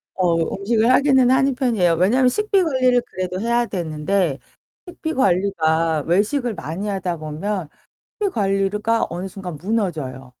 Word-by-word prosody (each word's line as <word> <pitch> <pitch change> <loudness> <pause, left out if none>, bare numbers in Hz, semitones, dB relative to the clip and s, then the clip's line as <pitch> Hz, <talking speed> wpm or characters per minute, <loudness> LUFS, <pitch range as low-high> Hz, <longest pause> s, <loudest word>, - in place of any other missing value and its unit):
어 180 -3 +2 0.2
음식을 220 +3 +1
하기는 265 -2 +4
하는 265 0 +3
편이에요. 225 -10 +2
왜냐면 240 +10 +3
식비 415 +6 +1
관리를 255 -5 +2
그래도 185 0 -4
해야 235 +1 +1
되는데 165 - -1 0.5
식비 320 -2 -5
관리가 165 - +1
외식을 220 - +1
많이 170 +3 -5
하다 190 -4 -2
보면 160 +3 -4 0.5
식비 405 - +2
관리가 205 +2 0
어느 175 +3 -5
순간 185 -3 -7
무너져요. 155 - -3
195 Hz, 325 characters per minute, -21 LUFS, 175-245 Hz, 0.5 s, 하기는